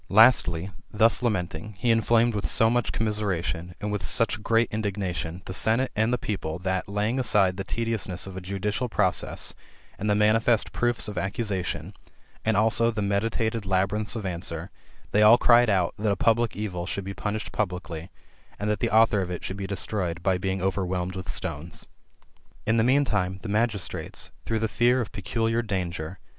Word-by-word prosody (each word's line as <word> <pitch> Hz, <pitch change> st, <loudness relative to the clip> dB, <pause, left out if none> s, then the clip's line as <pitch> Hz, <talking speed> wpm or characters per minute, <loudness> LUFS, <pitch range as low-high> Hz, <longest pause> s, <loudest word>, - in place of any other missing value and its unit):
Lastly, 95 Hz, -5 st, +5 dB, 0.2 s
thus 110 Hz, +3 st, +3 dB
lamenting, 105 Hz, -3 st, -2 dB
he 120 Hz, +2 st, +2 dB
inflamed 115 Hz, +1 st, +3 dB
with 105 Hz, -1 st, -1 dB
so 115 Hz, 0 st, +4 dB
much 120 Hz, -1 st, +1 dB
commisera^ 105 Hz, -5 st, -1 dB
tion, 85 Hz, +2 st, -4 dB
and 105 Hz, 0 st, -3 dB
with 105 Hz, -, -2 dB
such 115 Hz, -2 st, +1 dB
great 115 Hz, +1 st, +2 dB
indignation, 95 Hz, -5 st, -3 dB
the 95 Hz, -, -6 dB
senate 115 Hz, +6 st, +1 dB
and 110 Hz, +2 st, +2 dB
the 125 Hz, -, +2 dB
people, 90 Hz, -8 st, -4 dB
Uiat, 95 Hz, 0 st, -1 dB
laying 105 Hz, +5 st, -1 dB
aside 100 Hz, -7 st, +3 dB
the 95 Hz, -, -4 dB
tediousness 110 Hz, -6 st, -2 dB
of 95 Hz, -1 st, -8 dB
a 95 Hz, -, -5 dB
judicial 100 Hz, +6 st, -2 dB
process, 105 Hz, -4 st, 0 dB, 0.5 s
and 105 Hz, -, -1 dB
the 105 Hz, -, +3 dB
manifest 110 Hz, +2 st, +3 dB
proofs 120 Hz, -2 st, 0 dB
of 105 Hz, -, -3 dB
accusation, 100 Hz, -2 st, -3 dB, 0.5 s
and 110 Hz, -2 st, +1 dB
also 110 Hz, +2 st, +4 dB
the 110 Hz, -3 st, -2 dB
meditated 110 Hz, +2 st, 0 dB
labyrinths 95 Hz, +3 st, 0 dB
of 110 Hz, -3 st, -4 dB
answer, 85 Hz, -1 st, -5 dB, 0.4 s
they 105 Hz, -, +3 dB
all 110 Hz, +3 st, +8 dB
cried 120 Hz, -1 st, +5 dB
out, 95 Hz, -4 st, +2 dB
that 105 Hz, 0 st, +1 dB
a -, -, +2 dB
public 115 Hz, +3 st, +2 dB
evil 90 Hz, -4 st, -4 dB
should 100 Hz, -, -3 dB
be 100 Hz, -, -4 dB
punished 105 Hz, +1 st, -4 dB
publicly, 90 Hz, -4 st, -3 dB, 0.5 s
and 105 Hz, +1 st, -1 dB
that 105 Hz, -, -1 dB
[the -, -, 0 dB
author 110 Hz, -1 st, +4 dB
of] 90 Hz, -, -3 dB
it 90 Hz, -, -5 dB
should 95 Hz, -, -4 dB
be 100 Hz, -1 st, -5 dB
destroyed 90 Hz, -4 st, -2 dB
by 95 Hz, 0 st, +3 dB
being 95 Hz, 0 st, -2 dB
overwhelmed 95 Hz, -1 st, -1 dB
with 95 Hz, -3 st, -5 dB
stones. 80 Hz, +4 st, -3 dB, 0.8 s
In 110 Hz, +1 st, +2 dB
the 110 Hz, -, +4 dB
mean 135 Hz, +4 st, +4 dB
time, 95 Hz, -5 st, -1 dB
the 110 Hz, -, -5 dB
magistrates, 110 Hz, -2 st, -1 dB
through 115 Hz, -, 0 dB
the 110 Hz, 0 st, 0 dB
fear 120 Hz, +3 st, +3 dB
of 115 Hz, -, -3 dB
peculiar 115 Hz, +4 st, -1 dB
danger, 90 Hz, -5 st, -3 dB
vis. -, -, -35 dB
105 Hz, 185 wpm, -26 LUFS, 95-115 Hz, 0.8 s, all